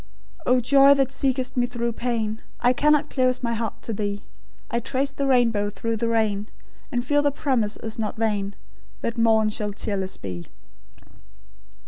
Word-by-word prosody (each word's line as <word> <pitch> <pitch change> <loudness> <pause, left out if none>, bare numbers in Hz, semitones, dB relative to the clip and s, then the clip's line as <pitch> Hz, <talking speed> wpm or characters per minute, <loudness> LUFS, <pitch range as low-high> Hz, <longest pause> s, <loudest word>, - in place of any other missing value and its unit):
"O 250 0 +5
Joy, 275 +3 +6
that 270 -1 +1
seekest 265 -1 -1
me 245 -1 +2
through 235 -1 -2
pain, 225 -2 -2 0.2
I 245 +1 +4
cannot 300 +2 +3
close 255 -1 +1
my 235 -1 0
heart 225 -1 -4
to 225 - -3
Thee; 205 0 -3 0.5
I 235 - +1
trace 270 +4 -1
the 275 0 -2
rainbow 230 -6 +3
through 230 +2 -3
the 230 - -1
rain, 215 -3 +1 0.4
And 245 -2 -1
feel 290 +2 +3
the 290 - +3
promise 255 -7 0
is 225 0 -5
not 215 -1 -2
vain 205 -3 -1 0.5
That 230 0 -2
morn 220 -1 +4
shall 210 -1 -3
tearless 195 -2 -3
be." 90 -3 -7
235 Hz, 165 wpm, -24 LUFS, 215-260 Hz, 0.5 s, Joy